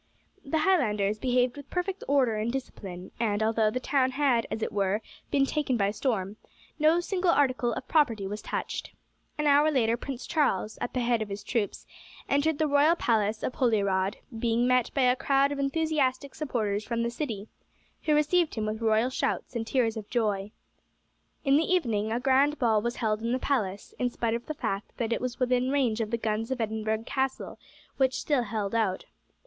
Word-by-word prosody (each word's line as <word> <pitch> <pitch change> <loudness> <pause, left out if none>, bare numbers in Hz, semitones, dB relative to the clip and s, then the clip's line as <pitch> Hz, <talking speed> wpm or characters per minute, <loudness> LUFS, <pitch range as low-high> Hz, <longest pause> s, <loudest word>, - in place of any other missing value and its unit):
The 280 +3 -1
Highlanders 215 - +2
behaved 250 0 +1
with 285 -1 -10
perfect 370 +2 -3
order 265 -5 +3
and 220 +2 -1
discipline, 190 -8 -6
and 215 -2 +1
although 220 0 +2
the 255 - -2
town 260 0 +1
had, 260 -4 +1
as 225 - -3
it - - -2
were, 200 0 +1 0.3
been 275 -1 +3
taken 275 -3 0
by 200 -1 +1
storm, 210 -3 -2 0.4
no 310 +3 +4
single 365 0 0
article 255 -6 +2
of 260 - -6
property 235 -10 +2
was 210 +2 -5
touched. - - -4 0.4
An 300 - -1
hour 290 +1 +5
later 235 -5 +2
Prince 260 0 -6
Charles, 265 - 0
at - - -3
the 250 - +1
head 235 -1 +1
of 215 - -3
his 200 +1 -6
troops, 225 -5 -2 0.4
entered 285 +2 +2
the 315 - +2
royal 295 +3 +4
palace 220 -7 0
of - - -1
Holyrod, 200 -6 +1 0.2
being 235 +1 +1
met 250 -1 +3
by 270 - +3
a 250 0 +4
crowd 275 +1 +2
of 285 - -3
enthusiastic 280 -2 0
supporters 220 -8 -2
from 235 +1 -2
the 235 - -1
city, 230 -6 -4 0.6
who 305 - +3
received 310 +3 +2
him 220 -2 -2
with 215 +1 -3
royal 225 +3 +2
shouts 260 - -2
and 225 -1 -2
tears 235 -2 +1
of 215 -2 -7
joy. 210 -4 0 1.0
In 275 +1 +5
the 325 +3 +1
evening 220 - +1
a 235 - 0
grand 275 +3 +3
ball 225 -5 +2
was 235 +2 -2
held 215 -2 -1
in 230 +1 -1
the - - +2
palace, 210 -8 -2
in 250 - +1
spite 230 -1 -1
of 235 +1 -4
the 310 - -4
fact 195 -6 -3
that 235 -1 -1
it - - -2
was 250 -1 -4
within 250 0 +2
range 250 -5 +1
of 215 - -2
the 235 - 0
guns 220 0 -2
of 260 -1 -2
Edinburgh 220 0 -1
Castle, 265 0 -2 0.4
which 260 -1 +2
still 285 -4 +1
held 210 -3 -3
out. 215 -5 0
240 Hz, 195 wpm, -28 LUFS, 215-275 Hz, 1.0 s, hour